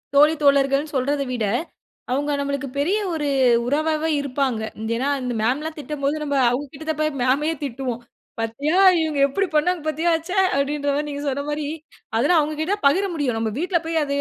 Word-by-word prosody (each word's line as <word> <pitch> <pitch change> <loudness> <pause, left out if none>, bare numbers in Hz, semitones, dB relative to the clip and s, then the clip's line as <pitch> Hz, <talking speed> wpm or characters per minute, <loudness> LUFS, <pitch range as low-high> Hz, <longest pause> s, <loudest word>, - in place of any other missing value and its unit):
தோழி, 300 +2 +6
தோழர்கள்ன்னு 280 +1 +3
சொல்றத 280 +2 0
விட, 235 -4 -1 0.7
அவுங்க 290 +3 0
நம்மளுக்கு 280 0 -2
பெரிய 335 +9 +1 0.2
ஒரு 300 -2 -2 0.4
உறவாவே 310 +3 0
இருப்பாங்க. 265 -4 -1 0.2
இந் 220 +1 -3
ஏன்னா, 270 +4 0
அந்த 250 -1 -3
மேம்ல்லாம் 295 +8 -1
திட்டும்போது, 290 0 -2
நம்ப 285 -1 -2
அவுங்க 260 +4 -2
கிட்ட 315 +3 -9
தான் 310 -1 -2
போய் 310 0 +1
மேமய 280 +6 +2
திட்டுவோம். 250 -3 -4 0.4
"பத்தியா, 275 +9 -1 0.2
இவுங்க 310 -3 -1
எப்படி 390 +8 0
பண்ணாங்க! 340 +2 +2
பத்தியா, 320 +3 +1 0.2
ச்ச" - - -3 0.3
அப்டின்ற 285 +1 0
மாரி, 295 +1 -1
நீங்க 285 0 -5
சொன்ன 280 +1 -2
மாரி 295 0 -2 0.5
அதெல்லாம் 295 +8 +4
அவுங்ககிட்ட 310 +6 -1
பகிர 380 +8 +2
முடியும். 255 -7 -1
நம்ப 225 -1 -1
வீட்ல 355 0 +1
போய், 330 - -1
அது 280 0 -2
285 Hz, 175 wpm, -22 LUFS, 275-310 Hz, 0.7 s, தோழி